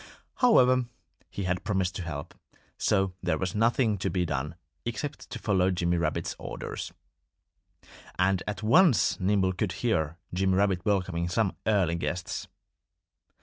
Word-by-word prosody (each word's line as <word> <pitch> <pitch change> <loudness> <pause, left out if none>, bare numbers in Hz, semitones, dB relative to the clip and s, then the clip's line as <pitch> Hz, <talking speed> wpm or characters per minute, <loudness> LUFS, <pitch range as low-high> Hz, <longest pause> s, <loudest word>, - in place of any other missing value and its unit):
However, 130 - +5 0.4
he 100 - -5
had 90 0 -1
promised 95 -4 0
to - - -4
help. 75 -5 -6 0.5
So 95 -1 +2
there 90 -3 0
was 95 0 -2
nothing 115 -1 +2
to 95 - -1
be 90 0 0
done 75 +1 -3 0.3
except 120 +5 -5
to - - -5
follow 95 -3 +2
Jimmy 85 -1 +1
Rabbit's 85 - -1
orders. - - -6 1.3
And 95 0 +2
at 105 0 -4
once 120 - +4
Nimble 95 0 +2
could 90 0 -2
hear 85 -9 0 0.2
Jimmy 95 +1 +2
Rabbit 95 -2 +2
welcoming 90 -4 0
some 100 +1 +1
early 95 -6 +3
guests. 85 +1 -3
95 Hz, 140 wpm, -28 LUFS, 90-105 Hz, 1.3 s, However